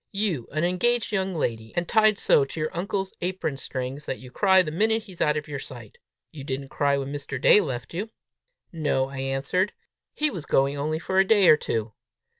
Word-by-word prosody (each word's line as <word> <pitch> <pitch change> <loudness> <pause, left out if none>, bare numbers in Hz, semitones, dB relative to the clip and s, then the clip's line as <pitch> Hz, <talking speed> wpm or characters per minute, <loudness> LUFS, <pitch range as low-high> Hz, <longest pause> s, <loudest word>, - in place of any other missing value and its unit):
"You 195 - -1
an 155 +2 -1
engaged 225 +8 +1
young 190 -3 -1
lady, 110 -7 -3
and 175 0 -1
tied 215 -2 +4
so 140 - +4
to 135 +4 -6
your 155 +1 -3
uncle's 190 +2 -2
apron 180 -5 -2
strings 135 +2 -5
that 130 - -2
you 125 -1 -12
cry 190 +3 +4
the 155 - -5
minute 220 +6 +1
he's 185 -5 -11
out 150 0 +2
of 150 - -5
your 145 -2 -5
sight! 485 - -11 0.3
You 150 -5 -9
didn't 135 0 -4
cry 140 0 +1
when 140 +1 -4
Mr. 140 -2 -5
Day 210 - +6
left 130 -7 -5
you!" 200 +6 -4 0.6
"No," 145 -5 0
I 135 -1 -7
answered; 135 +9 0 0.4
"he 300 0 +2
was 165 -5 -7
going 135 +1 +2
only 150 +2 -2
for 190 +3 0
a - - +7
day 200 -1 +4
or - - +9
two!" 115 -7 -3
155 Hz, 210 wpm, -25 LUFS, 135-190 Hz, 0.6 s, or